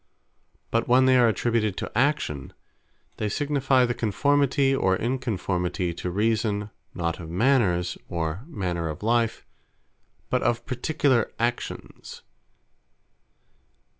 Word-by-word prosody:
But 115 - +1
when 130 +2 +5
they 130 0 +5
are 125 -2 +5
attributed 110 -2 0
to - - -4
Actions, 125 - 0 0.6
they 105 - -1
signifie 135 -1 +2
the 120 - -1
Conformity, 140 +4 +2
or 95 -8 +2
Inconformity 95 -8 -2
to 90 - -4
Reason, 105 +1 0 0.2
not 85 -1 -2
of 80 -2 -8
Manners, 90 -4 +1
or 85 +1 -2
manner 90 - -3
of 75 +5 -7
life, 115 0 +1 0.9
but - - +2
of 120 0 0
particular 130 -2 +1
Actions. 120 +1 -4
115 Hz, 110 wpm, -25 LUFS, 90-130 Hz, 0.9 s, when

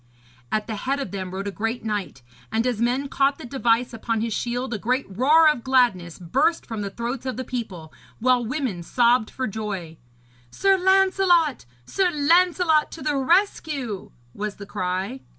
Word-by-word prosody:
At 215 0 0
the 220 -2 -5
head 275 +6 -1
of 265 -10 -4
them 190 -2 -4
rode 195 +2 -5
a - - -2
great 225 +4 -3
knight; 205 - -4 0.3
and 225 +2 0
as 245 -3 -1
men 250 +4 +1
caught 275 +1 +1
the - - -9
device 240 -2 +1
upon 225 0 -2
his 225 -1 -2
shield 245 +3 -2
a 215 - -3
great 255 +5 0
roar 285 - +4
of 300 -6 +2
gladness 240 -11 +2
burst 185 - 0
from 225 -2 -5
the 200 - -3
throats 235 +5 -4
of 255 - -3
the 260 - -3
people, 195 -11 -6 0.2
while 250 +1 +2
women 245 - -3
sobbed 235 +4 +2
for 260 - -3
joy. 195 -7 -5 0.5
'Sir 390 - +3
Lancelot! 375 - +3 0.2
Sir 380 - +1
Lancelot 330 +1 +3
to 325 - -8
the 300 -1 0
rescue!' 275 - 0 0.2
was 210 0 -4
the 200 - -9
cry. 190 +5 -3
245 Hz, 175 wpm, -23 LUFS, 210-280 Hz, 0.5 s, roar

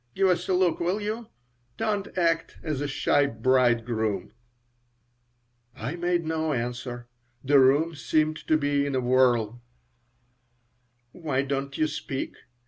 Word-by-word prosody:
Give 195 -1 +3
us 180 0 0
a 185 - +3
look, 180 -2 +2
will 180 +4 0
you? 215 +2 -4 0.5
Don't 205 -4 -2
act 165 -2 +1
as 150 -4 -2
a 145 - -1
shy 140 0 +2
bridegroom." 115 -4 +1 1.4
I 125 +6 -4
made 175 -1 0
no 160 -1 -1
answer. 120 0 -4 0.4
The 140 +1 +5
room 145 +6 +4
seemed 155 +1 0
to 155 - +4
be 145 -1 +1
in 140 - -2
a - - +2
whirl 120 -2 +2 1.5
"Why 140 -5 -2
don't 135 0 -3
you 155 - +2
speak?" 150 -3 -4
145 Hz, 135 wpm, -26 LUFS, 130-165 Hz, 1.5 s, The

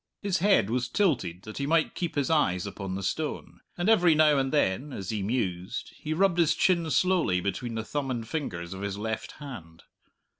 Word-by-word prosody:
His 190 -2 +1
head 180 - +3
was 125 0 0
tilted 115 - 0
that 110 +4 -8
he 140 - -1
might 160 0 +2
keep 170 -3 -3
his 145 +1 0
eyes 90 - +2
upon 100 -1 -5
the 100 - -4
stone; 155 - -3 0.2
and 175 +2 -1
every 180 -7 +5
now 150 -2 +5
and 135 0 0
then, 140 0 +1
as 95 -5 -5
he 105 -2 -2
mused, 95 -4 -2
he 155 - -6
rubbed 175 +2 +2
his 165 -2 +4
chin 170 -3 +2
slowly 165 - +2
between 100 +6 -3
the 110 -1 -3
thumb 145 +1 -3
and 115 -3 -3
fingers 90 - -4
of 95 - -7
his 100 -1 -3
left 110 +1 -4
hand. 105 - -10
130 Hz, 200 wpm, -28 LUFS, 100-160 Hz, 0.2 s, every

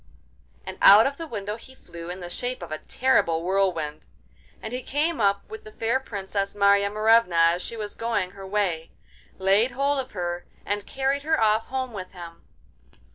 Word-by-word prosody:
and - - -8
out 205 +3 +9
of 280 +1 -1
the 330 - -6
window 210 -4 -4
he 260 +3 -15
flew 170 -7 -10
in 180 +1 -6
the 175 - -6
shape 245 0 -4
of 170 - -9
a 155 - -3
terrible 170 -11 +1
whirlwind. 175 -5 -1 0.5
And 220 - -7
he 250 - -3
came 295 +1 -1
up 200 -1 +1
with 435 0 -9
the 430 - -11
fair 235 - 0
Princess 200 -4 -4
Marya 200 0 +4
Morevna 215 -3 +3 0.2
as 175 - -3
she 230 - -7
was 210 -1 -5
going 230 -6 -2
her 195 0 -10
way, 190 -5 -1 0.5
laid 200 +6 +3
hold 280 +2 +1
of 260 0 -5
her 175 -2 -3 0.2
and 205 +1 -3
carried 270 +1 -1
her 315 +2 +1
off 220 0 +2
home 260 -1 -3
with 185 -3 -7
him. 170 -2 -10
205 Hz, 185 wpm, -25 LUFS, 185-255 Hz, 0.5 s, out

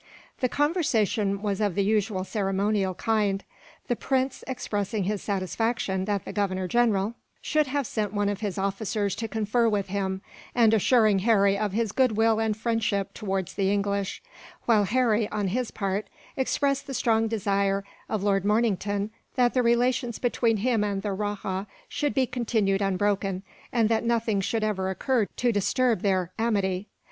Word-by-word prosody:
The 255 - +1
conversation 225 - +1
was 205 -1 -1
of 205 -4 +1
the 200 - +2
usual 205 -2 +1
ceremonial 195 -1 0
kind, 205 -1 0 0.4
the 245 - +1
prince 265 +1 -1
expressing 210 -5 -2
his 205 +1 -1
satisfaction 195 0 -1
that 205 -2 -1
the - - -6
Governor 190 -2 -1
General 220 -1 +2 0.3
should 305 -2 +1
have 280 +1 -1
sent 210 -3 -2
one 205 -1 0
of 205 -1 -1
his 205 -3 -3
officers 200 +1 -1
to 225 - -3
confer 220 +2 +1
with 200 -3 -1
him, 190 -1 -2 0.3
and 230 -3 +5
assuring 215 -2 +4
Harry 200 -1 +4
of 205 -1 -1
his 225 -1 0
goodwill 225 -3 +3
and 220 -1 0
friendship 220 -3 -1
towards 190 -4 -3
the 195 -1 +1
English; 200 - -1 0.4
while 215 -4 +4
Harry, 225 -1 +2
on 205 -2 -1
his 245 +4 -1
part, 195 0 -2 0.3
expressed 275 +1 0
the 270 - -4
strong 225 -1 +2
desire 200 -2 0 0.3
of 215 -3 -1
Lord 195 -2 +2
Mornington 205 -1 +1 0.2
that 245 -2 +3
the 255 - +3
relations 240 0 +1
between 235 -2 +1
him 225 0 +1
and 200 -2 -2
the 205 - -1
rajah 200 -1 -3 0.2
should 290 -1 -2
be 265 -2 +3
continued 220 -5 0
unbroken, 195 -1 0 0.3
and 230 -3 +3
that 225 0 +1
nothing 230 -3 +1
should 220 +3 -1
ever 190 -3 0
occur 225 +3 +1
to 245 -1 +2
disturb 225 +1 +1
their 185 -3 +1
amity. 200 -4 0
210 Hz, 160 wpm, -26 LUFS, 195-230 Hz, 0.4 s, and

